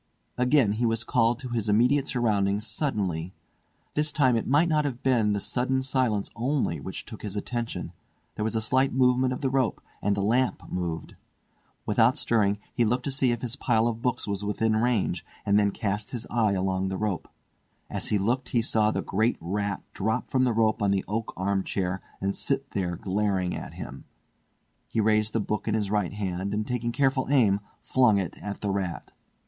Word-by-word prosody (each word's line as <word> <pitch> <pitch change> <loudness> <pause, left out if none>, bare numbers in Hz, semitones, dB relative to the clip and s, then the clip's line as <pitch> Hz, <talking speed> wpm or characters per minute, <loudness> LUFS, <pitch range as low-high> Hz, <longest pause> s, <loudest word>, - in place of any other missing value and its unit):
Again 125 -3 +3
he 115 +3 0
was 115 0 0
called 115 0 +2
to 125 - -6
his 115 -3 -1
immediate 125 +6 +3
surroundings 105 -4 +1
suddenly. 95 - -2 0.6
This 150 0 0
time 130 -5 +3
it 115 - -1
might 145 +6 +4
not 155 -2 +2
have 130 -4 -4
been 115 -6 +3
the 100 - 0
sudden 130 +5 0
silence 125 -6 0
only 120 - 0
which 95 +7 -6
took 110 - -9
his 105 -1 -5
attention; 120 +3 -4 0.4
there 105 - -3
was 110 +1 -1
a 110 - +1
slight 130 +4 +2
movement 130 0 +3
of 130 - -3
the 135 - +1
rope, 130 -4 +1 0.2
and 100 0 +1
the 100 - 0
lamp 125 +5 +1
moved. 85 -3 -3 0.7
Without 115 +4 +3
stirring, 105 -3 +2 0.2
he 120 - +2
looked 125 +3 +1
to 140 - -2
see 130 -2 +2
if 120 0 -3
his 120 0 -2
pile 115 -4 +2
of 115 -1 -3
books 125 -1 0
was 100 0 -2
within 110 +2 +1
range, 110 -6 +1 0.2
and 100 0 +4
then 100 -1 +3
cast 105 +1 -2
his 120 -2 -5
eye 110 -4 +2
along 95 0 0
the 95 0 -2
rope. 105 -4 -2 0.6
As - - -3
he 105 - +2
looked 125 +6 0
he 120 -2 +2
saw 110 -1 +2
the - - -1
great 110 +5 +1
rat 100 +4 -2
drop 110 +3 -1
from 130 -1 +2
the 125 - +2
rope 110 0 +2
on 100 - +2
the 95 -1 +1
oak 110 +2 -2
arm 95 +1 0
chair 95 -1 -2 0.2
and 100 +1 0
sit 135 +3 -2
there 90 -3 -1
glaring 95 -1 0
at - - -7
him. - - -8 0.8
He - - -2
raised 110 0 +2
a - - +3
book 105 0 -2
in - - +1
his 105 -2 -1
right 105 -4 0
hand, 100 -1 -2
and 105 0 -1
taking 120 -1 -2
careful 135 0 +1
aim, 110 -8 +4 0.2
flung 125 -5 +4
it 95 -4 -2
at 105 -1 -5
the 100 - 0
rat. 95 -3 -3
110 Hz, 200 wpm, -27 LUFS, 100-125 Hz, 0.8 s, might